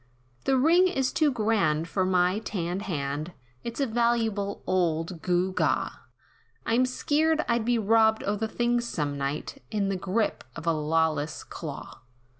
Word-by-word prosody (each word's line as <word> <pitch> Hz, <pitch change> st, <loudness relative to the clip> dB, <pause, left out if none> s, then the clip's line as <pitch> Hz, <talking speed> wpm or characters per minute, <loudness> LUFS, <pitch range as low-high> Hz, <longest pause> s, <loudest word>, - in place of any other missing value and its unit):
"The 265 Hz, -, +3 dB
ring 335 Hz, +7 st, +5 dB
is 270 Hz, -8 st, 0 dB
too 310 Hz, -2 st, +3 dB
grand, 210 Hz, -, +1 dB
for 185 Hz, +2 st, 0 dB
my 185 Hz, +1 st, +2 dB
tanned 185 Hz, -4 st, -3 dB
hand, 145 Hz, +1 st, -3 dB, 0.3 s
It's 235 Hz, +2 st, -5 dB
a 280 Hz, -, +2 dB
valuable 225 Hz, -4 st, 0 dB
old 170 Hz, -2 st, 0 dB
gew 180 Hz, +1 st, +1 dB
gaw, -, -, +1 dB, 0.7 s
I'm 245 Hz, +3 st, +3 dB
skeered, 310 Hz, +4 st, +1 dB
I'd 235 Hz, -2 st, +1 dB
be 240 Hz, 0 st, +2 dB
robbed 220 Hz, 0 st, +3 dB
o' 205 Hz, -, 0 dB
the 220 Hz, +2 st, -2 dB
thing 240 Hz, +2 st, +1 dB
some 150 Hz, -11 st, -2 dB
night, 140 Hz, -, -4 dB
In 205 Hz, -3 st, 0 dB
the 195 Hz, -, 0 dB
grip 195 Hz, +4 st, -1 dB
of 165 Hz, -, -7 dB
a 165 Hz, -, +3 dB
lawless 155 Hz, -1 st, 0 dB
claw. 145 Hz, -4 st, -8 dB
200 Hz, 155 wpm, -27 LUFS, 165-235 Hz, 0.7 s, ring